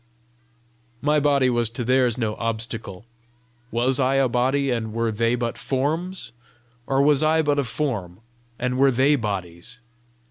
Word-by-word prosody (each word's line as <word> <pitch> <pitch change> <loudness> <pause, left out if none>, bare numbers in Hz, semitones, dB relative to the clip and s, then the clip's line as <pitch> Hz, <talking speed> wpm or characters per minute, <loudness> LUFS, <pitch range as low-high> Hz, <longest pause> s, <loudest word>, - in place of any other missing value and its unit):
My 150 +1 +3
body 140 -2 +3
was 120 -2 +1
to 115 +2 -5
theirs 125 -1 +2
no 110 -3 -1
obstacle: 115 -3 -4 0.6
was 125 +3 +1
I 130 +1 +2
a 135 -1 +3
body, 130 +3 +1
and 110 -3 -2
were 115 0 0
they 115 +2 +1
but 120 -1 -3
forms? 160 +8 -2 0.6
or 135 0 +2
was 145 0 +4
I 160 +1 +3
but 145 -1 +1
a - - +2
form, 110 - -3 0.4
and 125 +1 -2
were 135 0 +6
they 135 +4 +3
bodies? 95 -8 -5
125 Hz, 150 wpm, -23 LUFS, 115-140 Hz, 0.6 s, were